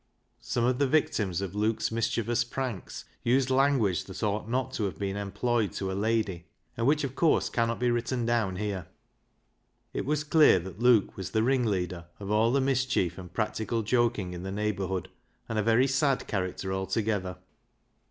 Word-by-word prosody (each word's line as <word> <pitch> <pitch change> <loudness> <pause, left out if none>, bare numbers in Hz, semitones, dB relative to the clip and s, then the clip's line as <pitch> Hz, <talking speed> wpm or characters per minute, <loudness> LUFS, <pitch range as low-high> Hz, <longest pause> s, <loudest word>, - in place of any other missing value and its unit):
Some 120 - -2
of 125 +1 +1
the 140 - +3
victims 105 - +1
of 95 -2 -4
Luke's 110 +2 0
mischievous 115 +1 0
pranks 120 -5 -5 0.2
used 130 +2 +2
language 130 -8 +2
that 95 +3 -7
ought 105 +1 -1
not 130 +1 -1
to 110 - -1
have 90 -5 -4
been 100 +1 -2
employed 105 0 -1
to 95 -1 -3
a - - -2
lady, 100 -4 -1 0.3
and 115 +1 0
which 150 +1 +3
of 135 -2 -3
course 160 +3 +2
cannot 115 0 0
be 125 0 +2
written 120 +1 -1
down 115 -5 +1
here. 95 -3 -3 1.1
It - - -3
was 150 0 +1
clear 155 -7 +6
that 90 +2 -7
Luke 120 -4 +4
was 95 -1 -4
the 110 +3 +1
ringleader 100 -9 0
of 100 0 -5
all 110 +2 +3
the 140 - +3
mischief 130 -9 0
and 90 -2 -10
practical 110 +2 -1
joking 110 -5 +1
in 90 - -6
the 95 +1 -5
neighbourhood, 100 -2 -2 0.4
and 110 -1 -1
a - - +3
very 115 +4 +4
sad 135 0 +1
character 95 -1 -3
altogether. 95 -1 -1
110 Hz, 175 wpm, -28 LUFS, 95-125 Hz, 1.1 s, clear